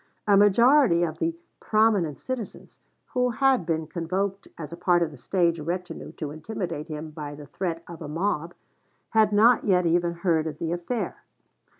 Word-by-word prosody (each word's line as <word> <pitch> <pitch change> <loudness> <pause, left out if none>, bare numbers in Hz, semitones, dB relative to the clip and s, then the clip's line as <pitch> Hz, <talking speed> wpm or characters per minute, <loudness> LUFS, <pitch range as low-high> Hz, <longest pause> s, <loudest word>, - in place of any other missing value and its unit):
A 205 - +6
majority 205 - +5
of 160 -2 -3
the 330 0 0 0.2
"prominent 215 -9 +2
citizens," 255 -5 -7 0.3
who 250 -1 +2
had 255 - +2
been 160 -1 0
convoked 185 +5 -3
as 155 -1 -7
a - - -4
part 175 0 +2
of 160 - -3
the 145 - -12
stage 170 +4 +1
retinue 175 +2 -5
to 150 -3 -5
intimidate 160 -1 -5
him 155 -1 -6
by 150 -1 -7
the 145 0 -10
threat 170 +1 -4
of 170 -1 -10
a 155 - -5
mob, 165 +1 -2 0.6
had 220 -2 +4
not 220 +3 +5
yet 180 -3 +3
even 170 +1 +2
heard 170 -2 0
of 150 -2 -5
the 165 +1 -3
affair. 175 +8 -3
175 Hz, 175 wpm, -26 LUFS, 160-205 Hz, 0.6 s, A